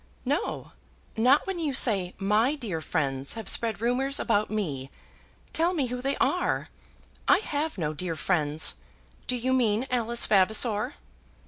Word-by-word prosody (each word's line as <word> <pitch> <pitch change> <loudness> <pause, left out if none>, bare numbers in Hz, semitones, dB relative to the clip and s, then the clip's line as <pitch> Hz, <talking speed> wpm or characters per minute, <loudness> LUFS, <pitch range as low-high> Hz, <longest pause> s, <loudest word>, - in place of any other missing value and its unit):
"No; - - -2 0.4
not 255 +6 +4
when 385 -2 -4
you 295 -5 -1
say 195 -8 +4
my 215 +8 +2
dear 205 - -5
friends 140 -4 -1
have 225 -1 -7
spread 225 -3 +2
rumours 260 +4 +1
about 215 -2 +1
me. 145 -11 -3 0.6
Tell 340 +3 +1
me 290 -5 0
who 250 - -4
they 275 +2 -1
are. 360 0 0 0.6
I - - +6
have 310 - -3
no 155 -3 -2
dear 165 +2 -4
friends. 155 -2 0 0.5
Do 250 - 0
you 255 +2 -1
mean 235 -2 +1
Alice 235 -1 +2
Vavasor?" 215 +5 +2
225 Hz, 145 wpm, -27 LUFS, 185-260 Hz, 0.6 s, I